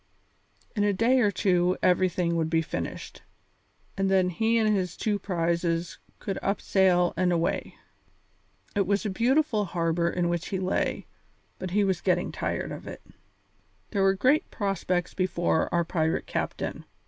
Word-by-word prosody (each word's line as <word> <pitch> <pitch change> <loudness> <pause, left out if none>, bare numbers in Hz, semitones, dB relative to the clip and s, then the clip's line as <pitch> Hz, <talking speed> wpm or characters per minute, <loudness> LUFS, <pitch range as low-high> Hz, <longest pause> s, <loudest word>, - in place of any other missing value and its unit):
In 205 - +1
a 205 0 +2
day 235 +6 +3
or 210 -4 +4
two 180 -2 +2
everything 180 -1 +2
would 160 -1 0
be 165 0 +2
finished, - - -6 0.7
and 195 0 0
then 185 -1 +3
he 225 +6 +1
and 220 -1 +3
his 180 -3 -2
two 210 -2 0
prizes 170 -2 -1 0.2
could 195 - -4
up 200 - 0
sail 180 -2 +3
and 180 +1 +1
away. 170 -1 -1 1.0
It 200 -3 +1
was 200 +2 +1
a 210 - -1
beautiful 245 +2 +2
harbour 170 -1 0
in 175 0 0
which 175 -1 -2
he 190 - -2
lay, 185 0 -1 0.5
but 185 - -4
he 205 +3 +2
was 190 -3 0
getting - - +1
tired - - -3
of - - -8
it. - - -8 0.9
There 200 - 0
were 195 0 +4
great 260 +10 +2
prospects 185 -3 -1
before 175 -3 0
our 170 -1 +1
pirate 160 -1 0
captain. - - -4
185 Hz, 160 wpm, -27 LUFS, 170-200 Hz, 1.0 s, or